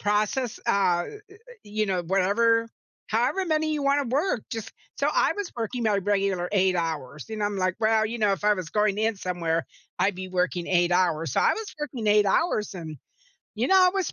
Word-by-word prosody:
process," 215 +4 0
uh, 175 -3 +2
y - - -8 0.2
y 395 +2 -17 0.3
you 215 +1 -2
know, 185 -3 -1
"whatever 220 +6 +2 0.4
however 245 - +1
many 310 -1 +1
you 295 -2 -2
wanna 280 0 +2
work 265 - 0
just" 225 -2 -5 0.3
So, - - +1
I - - +3
was 410 -3 -4
working 235 +2 -3
my 210 -3 +2
regular 195 -2 0
8 190 -2 +3
hours, 155 -4 -3
you 220 - -5
know, 210 - -1
I'm, 205 -1 -2
like, 185 -1 0
"Well, 220 0 +3
you 235 +2 -5
know, 210 -2 +3
if 195 - -4
I 210 0 +5
was 185 -3 -6
going 210 -1 +1
in 220 +1 +1
somewhere, 170 -3 -2 0.3
I'd 200 0 +2
be 185 0 -6
working 180 -1 -1
8 175 -1 +2
hours." 170 -3 +1
So, - - +3
I - - +4
was 445 -1 -6
working 260 -7 -4
8 210 0 +5
hours, 215 - +1
and 160 -4 -7 0.6
you - - 0
know, 385 - +5
I 365 -1 +6
was 385 -2 -1
205 Hz, 210 wpm, -26 LUFS, 185-230 Hz, 0.6 s, I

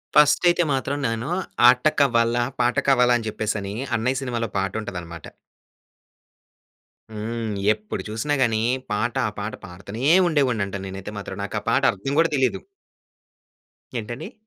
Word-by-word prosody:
ఫస్టయితే 175 +4 +5
మాత్రం 135 +1 -1
నేను, 115 +4 -3 0.4
'ఆట 125 +2 +3
కవ్వాలా, 120 -3 +3 0.2
పాట 120 0 +2
కావాలా' 125 -2 +5
అని 115 -2 -5
చెప్పేసని, 105 -2 -3 0.2
అన్నయ్య 125 +3 0
సినిమాలో 120 -3 -2
పాటుంటదన్నమాట. 90 -4 -4 1.8
హ్మ్. 110 +1 -4 0.2
ఎప్పుడు 105 0 -6
చూసినా 115 +7 -2
గాని 115 -3 +2 0.3
పాట 110 +3 -1
ఆ - - -4
పాట 100 +2 -4
పాడుతనే 100 +6 -8 0.2
ఉండేవాన్నంట 125 - 0
నేనైతే 95 +1 -7
మాత్రం. 95 -1 -7
నాకా 100 - -3
పాట - - +3
అర్థం 135 +9 -4
కూడా 165 0 +4
తెలీదు. 130 -2 +1 1.4
ఏంటండి? 120 - -7
115 Hz, 120 wpm, -23 LUFS, 105-125 Hz, 1.8 s, ఫస్టయితే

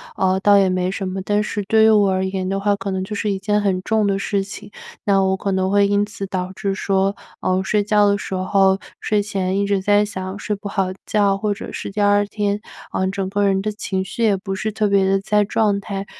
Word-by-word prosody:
呃， 190 0 +1
倒 205 +1 +5
也 195 -1 +4
没 185 0 0
什 195 +1 -4
么， 190 +1 -3
但 210 0 +1
是 210 0 -3
对 220 0 +4
于 220 - +6
我 205 -2 +4
而 190 0 0
言 190 -1 -3
的 195 +1 -1
话， 205 0 +1
可 200 - -4
能 190 0 -2
就 195 - -6
是 210 0 -1
一 195 - 0
件 210 +1 +1
很 190 -2 0
重 220 +1 +1
的 195 -1 +1
事 200 0 -1
情。 205 +1 -9 0.3
那 195 -1 +3
我 190 0 +2
可 195 +1 -3
能 190 0 0
会 200 +1 +4
因 205 +1 +2
此 205 -1 -6
导 185 -1 -3
致 195 -1 -2
说， 195 0 0 0.3
呃， 185 - +1
我 - - +1
睡 205 +2 +1
觉 210 0 +3
的 200 0 +2
时 200 - -6
候 190 +1 +2 0.2
睡 210 -1 +1
前 195 -2 -2
一 200 - 0
直 200 -1 +1
在 205 +2 +3
想 190 -1 -6
睡 210 0 -2
不 205 0 -7
好 195 -2 0 0.2
觉， 200 -2 +2
或 205 +1 -1
者 200 - -8
是 - - -5
第 210 - -5
2 205 0 +3
天， 205 0 -2 0.3
呃， 190 - 0
整 195 -1 -3
个 205 +1 0
人 195 -1 +2
的 215 - -2
情 190 -2 -3
绪 230 +4 -4
也 210 -3 +3
不 195 0 -5
是 215 +3 -2
特 215 0 0
别 200 -1 +3
的 195 0 +2
在 210 +1 +2
状 205 0 +1
态， 195 -1 -5
200 Hz, 275 characters per minute, -20 LUFS, 190-205 Hz, 0.3 s, 于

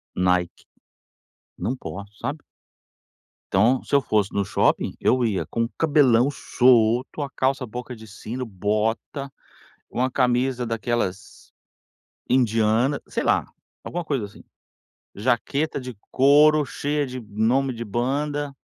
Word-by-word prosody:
Nike 90 -1 +2 1.1
não 125 - -2
posso, 100 -4 -8
sabe? 150 +2 -3 1.1
Então, 115 +7 +3
se - - -1
eu 140 - +5
fosse 105 -5 0
no 100 - +1
shopping, 100 - +1
eu 125 0 +2
ia 110 -5 0
com 115 0 -2
cabelão 140 -6 +4
solto, 125 0 +2
a 140 - -3
calça 130 -1 0
boca 125 +2 -7
de 110 -1 -12
sino, 110 +4 -6
bota, 110 +7 -2 0.6
uma 130 +1 0
camisa 125 0 +1
daquelas 115 -4 -3 0.8
indianas, 115 +2 +2
sei - - -2
lá, - - +2 0.4
alguma 175 0 -4
coisa 140 -9 -2
assim. 100 - -14 0.7
Jaqueta 130 +8 0
de 125 -2 -8 0.2
couro, 150 +2 +5
cheia 145 +2 -2
de 125 -1 -6
nome 115 +6 0
de 115 0 -6
banda. 140 +6 -2
125 Hz, 120 wpm, -23 LUFS, 110-135 Hz, 1.1 s, eu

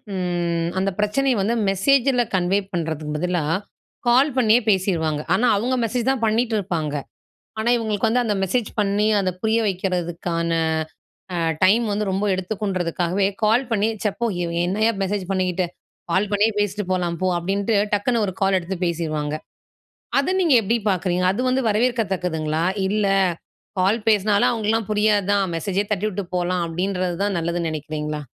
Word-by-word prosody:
ம் 175 -2 -1
அந்த 195 +1 0
பிரச்சனையை 245 +4 +1
வந்து 225 +5 +1
மெசேஜில 250 +5 +3
கன்வே 185 +2 +2
பண்ணுறதுக்கு 155 -3 -3
பதிலா, 175 -1 -1 0.7
கால் 265 +5 +4
பண்ணியே 235 0 +4
பேசிருவாங்க. 170 -6 +1
ஆனா 235 +6 +2
அவங்க 245 +5 0
மெசேஜ் 240 +3 -1
தான் 250 -4 -2
பண்ணிட்டு 225 +1 +1
இருப்பாங்க. 165 -6 -2 0.6
ஆனா, 220 +2 0
இவங்களுக்கு 220 -2 0
வந்து 245 +3 +2
அந்த 210 -2 0
மெசேஜ் 220 +4 0
பண்ணி, 205 +1 +1
அதை 185 -2 0
புரிய 220 +1 +2
வைக்கிறதுக்கான 175 -2 -2 0.8
அ, - - -1 0.3
டைம் 215 +6 +5
வந்து 210 +1 -1
ரொம்ப 195 +2 -1
எடுத்துக்குன்றதுக்காகவே 185 -2 -1 0.2
கால் 225 +5 +3
பண்ணி 215 -1 +2
"ச்ச - - 0
போ 235 - +2 0.2
இவ 170 - -2 0.2
என்னயா 215 +5 +1
மெசேஜ் 195 0 -1
பண்ணிக்கிட்டு, 185 -1 0 0.4
கால் 190 +4 +2
பண்ணியே 210 +2 +3
பேசிட்டு 205 0 -1
போலாம் 175 -2 -1
போ" 185 - +1
அப்படின்ட்டு 200 +5 -1 0.2
டக்குனு 220 +3 +1
ஒரு 190 - -3
கால் 195 -1 +3
எடுத்து 185 +2 -5
பேசிருவாங்க. 155 -3 -2 0.8
அதை 280 +7 0
நீங்க 320 -8 +4
எப்படி 225 +4 +1
பாக்குறீங்க? 180 -1 0
அது 215 - -2
வந்து 260 +1 +1
வரவேற்கத்தக்குதுங்களா? 190 -9 0 0.2
"இல்லை 200 -1 +1 0.7
கால் 205 +5 +2
பேசினாலும் 205 -1 +3
அவங்களாம் 225 -1 -1
புரியாது 210 -1 +2
தான். 200 -1 +2
மெசேஜே 195 +4 -1
தட்டிவிட்டு 200 0 -2
போலாம்" 180 0 0
அப்படின்றது 180 +1 -2
தான் 200 -3 0
நல்லதுன்னு 170 0 -1
நினைக்கிறீங்களா? 150 0 -4
195 Hz, 150 wpm, -22 LUFS, 175-220 Hz, 0.8 s, டைம்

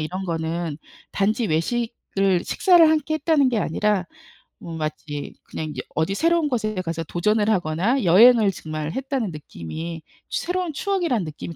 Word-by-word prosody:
이런 185 +5 -4
거는 165 -1 -2 0.4
단지 215 +3 +1
외식을 195 0 0
식사를 350 -4 +5
함께 310 0 +1
했다는 310 -4 +3
게 240 - 0
아니라 205 +1 0 0.6
뭐, 165 -1 -7
마치 155 -2 -5
그냥 155 - -6
여 - - -2
어디 160 +6 0
새로운 330 0 +2
곳에 215 -4 -1
가서 165 -1 -3
도전을 210 +7 0
하거나 195 - +1
여행을 215 +4 +7
정말 155 -2 -5
했다는 265 -5 -2
느낌이 160 - -7 0.3
새로운 355 -2 -2
추억이라는 340 - 0
느낌이 155 +2 -7
195 Hz, 330 characters per minute, -23 LUFS, 160-255 Hz, 0.6 s, 여행을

